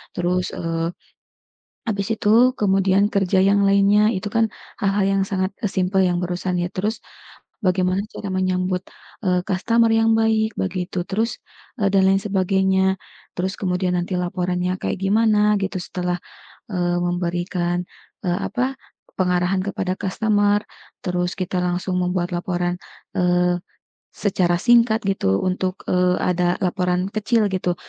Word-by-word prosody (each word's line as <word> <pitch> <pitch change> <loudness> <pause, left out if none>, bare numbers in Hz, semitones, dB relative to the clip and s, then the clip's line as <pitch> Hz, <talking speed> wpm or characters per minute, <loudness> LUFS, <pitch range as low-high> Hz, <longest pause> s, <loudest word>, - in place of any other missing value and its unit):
Terus, 180 +1 0
eee, 165 0 -2 1.0
habis 200 -2 -1
itu 225 +4 +4
kemudian 195 0 +3
kerja 195 -1 +2
yang 200 +1 +4
lainnya, 200 +1 +4
itu 190 +2 -3
kan 225 -1 +2 0.3
hal-hal 195 0 +2 0.2
yang - - +2
sangat 190 -1 -1 0.2
simple, 190 +1 0
yang 175 -1 +1
barusan 180 +1 -2
ya. 175 0 -1
Terus, 210 +4 -2 0.6
bagaimana 185 -1 +1
cara 205 - -7
menyambut, 185 0 0 0.4
eee, 180 -1 +2
customer 230 +4 +2
yang 225 0 +4
baik 220 -1 +2
begitu, 180 - -2
terus, 220 +4 -1 0.4
e 210 - 0
dan 190 -1 +5
lain 195 - +4
sebagainya. 190 -1 +1 0.4
Terus, 185 +1 -1
kemudian 180 -1 -1
nanti 175 +1 -2
laporannya 180 0 -1
kayak - - -2
gimana, 210 +1 +3
gitu, 190 -1 -2
setelah, 180 -1 -3 0.5
eee, 175 -3 0
memberikan, 175 0 -1 0.4
e - - +1
apa, 250 +9 -1 0.4
pengarahan 180 +1 +1
kepada 190 -2 -2
customer. 205 +1 +1 0.4
Terus, 180 -1 -1
kita 185 0 -2
langsung 180 +1 -1
membuat 180 0 -1
laporan, 175 0 -2 0.4
eee, 180 0 +2 0.6
secara 180 -4 +1
singkat 230 +1 +4
gitu, 95 - +1
untuk, 185 0 -2
eee, 180 0 +2
ada 180 0 +1
laporan 180 0 0
kecil 215 +1 +1
gitu, 180 -1 0
185 Hz, 130 wpm, -22 LUFS, 180-200 Hz, 1.0 s, dan